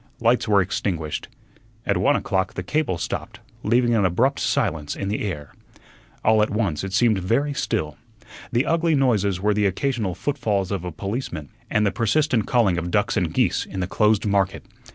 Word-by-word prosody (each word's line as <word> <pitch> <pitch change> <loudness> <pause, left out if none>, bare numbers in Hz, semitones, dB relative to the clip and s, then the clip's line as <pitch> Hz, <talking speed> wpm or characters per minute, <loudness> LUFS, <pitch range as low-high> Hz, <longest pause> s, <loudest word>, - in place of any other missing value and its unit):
Lights 115 0 +2
were 100 -2 +4
extinguished. 85 -4 -3 0.6
At - - +1
one - - +3
o'clock 95 -1 -1
the 90 - -3
cable 135 - 0
stopped, - - -5 0.2
leaving 120 +2 +2
an 110 -3 +3
abrupt 115 +10 +2
silence 75 -2 -1
in 100 - -3
the 105 - -2
air. 75 -8 -5 0.7
All 110 0 +4
at 105 - +2
once 100 -8 -1
it 95 - -4
seemed 110 0 +3
very 125 +11 0
still. 95 - -2 0.5
The 120 +2 +2
ugly 165 -1 +2
noises 105 -9 +2
were 105 +2 +2
the 105 0 +2
occasional 110 -2 -1
footfalls 110 -10 -1
of 95 -4 -2
a 90 - -4
policeman 95 - -5 0.2
and 105 0 +2
the 100 - +2
persistent 125 0 +1
calling 105 -8 +3
of 85 +1 -4
ducks 105 +3 +1
and 90 -6 0
geese - - +1
in 95 - -7
the 90 - 0
closed 105 +3 +2
market. 100 -2 0
105 Hz, 180 wpm, -23 LUFS, 95-120 Hz, 0.7 s, were